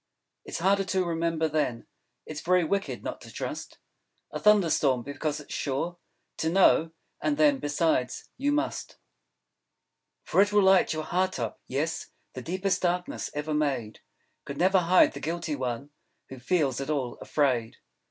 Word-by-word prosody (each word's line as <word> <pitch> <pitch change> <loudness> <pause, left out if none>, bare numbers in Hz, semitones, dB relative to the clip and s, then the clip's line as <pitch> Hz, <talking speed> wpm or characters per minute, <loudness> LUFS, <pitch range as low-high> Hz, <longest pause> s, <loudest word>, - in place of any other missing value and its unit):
It's - - -5
harder 195 +3 +2
to 185 0 +1
remember, 165 -1 0
then: 145 -6 -1 0.4
It's 150 -1 -6
Very 180 0 +3
Wicked 200 +5 -2
not - - -5
to - - -11
trust - - -6 0.5
A - - -4
Thunder 210 -6 +5
Storm. 130 -4 +2
Because 145 +2 -3
it's 150 - -9
Sure 160 +6 -2 0.4
To 160 - 0
know! 165 -2 +4 0.3
And 150 -1 0
then, 145 -3 +4
besides, 145 -3 0
you 285 +3 0
Must. 305 +2 -2 1.3
_For - - +3
it 205 - -3
will 205 -1 +4
light 190 0 +5
your 155 0 -2
Heart 185 +4 0
up. 115 -4 -4
Yes; 155 +5 -2 0.3
The 130 - -6
Deepest 185 +7 -1
Darkness 180 0 -1
ever 150 +1 -2
Made 135 -8 -1 0.4
Could 140 - -7
Never 185 +3 +4
Hide 180 +1 +5
the 140 - -7
Guilty 165 0 -3
One... 130 +1 -4 0.4
Who 130 - -9
feels 140 -1 0
At 135 - -5
All 135 -5 -2
Afraid. 125 -6 0
155 Hz, 160 wpm, -27 LUFS, 140-180 Hz, 1.3 s, Thunder